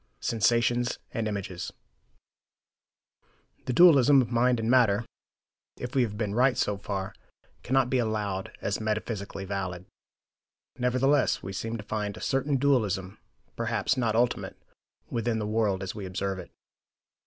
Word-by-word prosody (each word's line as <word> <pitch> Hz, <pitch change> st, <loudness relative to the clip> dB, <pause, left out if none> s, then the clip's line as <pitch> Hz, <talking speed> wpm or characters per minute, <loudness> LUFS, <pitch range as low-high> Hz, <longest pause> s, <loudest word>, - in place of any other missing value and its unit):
SENSATIONS 120 Hz, +2 st, +1 dB, 0.2 s
AND 115 Hz, -1 st, -1 dB
IMAGES 95 Hz, -4 st, -4 dB, 1.9 s
The 125 Hz, -, -1 dB
dualism 145 Hz, -4 st, +7 dB
of 120 Hz, -2 st, 0 dB
mind 120 Hz, 0 st, +3 dB
and 110 Hz, -, -2 dB
matter, 115 Hz, -3 st, +4 dB, 0.7 s
if 125 Hz, 0 st, -6 dB
we 135 Hz, -, +3 dB
have 105 Hz, -4 st, -1 dB
been 105 Hz, -2 st, -2 dB
right 125 Hz, +2 st, +3 dB
so 105 Hz, -5 st, +1 dB
far, 95 Hz, -1 st, -4 dB, 0.5 s
cannot 130 Hz, 0 st, +2 dB
be 130 Hz, -, +2 dB
allowed 105 Hz, -4 st, -2 dB
as 100 Hz, +2 st, -2 dB
metaphysically 105 Hz, -2 st, -3 dB
valid. 95 Hz, -2 st, -4 dB, 0.9 s
Nevertheless, 130 Hz, +3 st, +2 dB
we 95 Hz, -, -5 dB
seem 115 Hz, +4 st, -3 dB
to 105 Hz, -, -8 dB
find 105 Hz, -1 st, -3 dB
a -, -, -8 dB
certain 135 Hz, +1 st, 0 dB
dualism, 105 Hz, -8 st, 0 dB, 0.4 s
perhaps -, -, 0 dB
not 115 Hz, -4 st, 0 dB
ultimate, 120 Hz, +1 st, 0 dB, 0.5 s
within 115 Hz, -1 st, 0 dB
the 105 Hz, -, -2 dB
world 105 Hz, -3 st, 0 dB
as 95 Hz, -, -4 dB
we 100 Hz, -3 st, -6 dB
observe 95 Hz, +1 st, -3 dB
it. -, -, -9 dB
110 Hz, 140 wpm, -28 LUFS, 100-125 Hz, 1.9 s, dualism